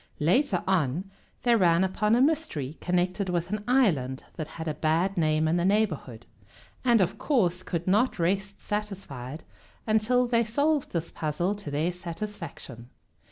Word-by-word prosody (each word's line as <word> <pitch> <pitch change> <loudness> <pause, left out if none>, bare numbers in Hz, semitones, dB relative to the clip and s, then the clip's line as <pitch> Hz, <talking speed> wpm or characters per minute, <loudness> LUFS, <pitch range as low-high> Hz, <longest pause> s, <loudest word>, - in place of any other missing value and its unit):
Later 180 - +2
on 180 0 0 0.3
they 240 -1 +4
ran 175 -4 +4
upon 210 +4 +2
a 245 - +3
mystery 275 - 0
connected 180 +2 0
with 175 +1 -1
an 210 0 -2
island 160 - +2
that 155 - -4
had 165 0 -5
a 155 - 0
bad 165 +5 +1
name 155 -2 +2
in 165 +2 +2
the 170 - +1
neighborhood, 175 - 0 0.6
and 235 -4 +4
of 185 0 0
course 185 - +1
could 170 -2 -3
not 215 +7 +2
rest 195 +3 -1
satisfied 180 - -5 0.4
until 220 +3 +3
they 235 -1 +2
solved 285 +6 0
this 170 -1 -3
puzzle 165 +5 -1
to 205 -7 -7
their 155 +5 0
satisfaction. 170 - -7
185 Hz, 155 wpm, -27 LUFS, 160-215 Hz, 0.6 s, they